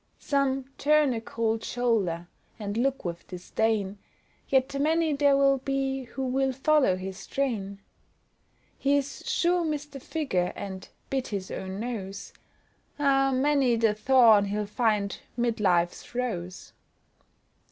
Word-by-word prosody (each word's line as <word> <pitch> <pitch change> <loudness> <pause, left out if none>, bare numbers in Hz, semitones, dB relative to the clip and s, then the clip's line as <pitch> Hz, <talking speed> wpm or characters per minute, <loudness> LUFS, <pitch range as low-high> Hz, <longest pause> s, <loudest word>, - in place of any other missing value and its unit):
Some 270 -2 0
"turn 300 -2 +4
a 225 - -3
cold 225 -1 -2
shoulder," 205 -9 0 0.3
and 205 -2 -4
look 265 +1 0
with 170 -1 -5
disdain, 200 +2 -1 0.5
Yet 270 +1 +1
many 320 +1 +2
there'll 275 -1 +4
be 270 0 -2
who 265 +2 -5
will 265 +1 +1
follow 270 - +3
his 190 +1 -7
train. 215 -8 -2 1.0
He's 280 0 0
"sure 350 0 +2
missed 295 -2 -3
a - - -5
figure," 260 - -1
and 190 -2 -7 0.2
"bit 265 -2 -1
his 195 -3 -4
own 190 +1 -5
nose," 200 -4 -5 0.6
Ah, 270 -1 +3
many 265 -2 +3
the 225 -2 +2
thorn 225 -2 +5
he'll 205 +1 -2
find 210 -2 0 0.2
'mid 235 -2 0
life's 175 +2 +1
rose. 185 -8 -4
245 Hz, 125 wpm, -27 LUFS, 200-275 Hz, 1.0 s, thorn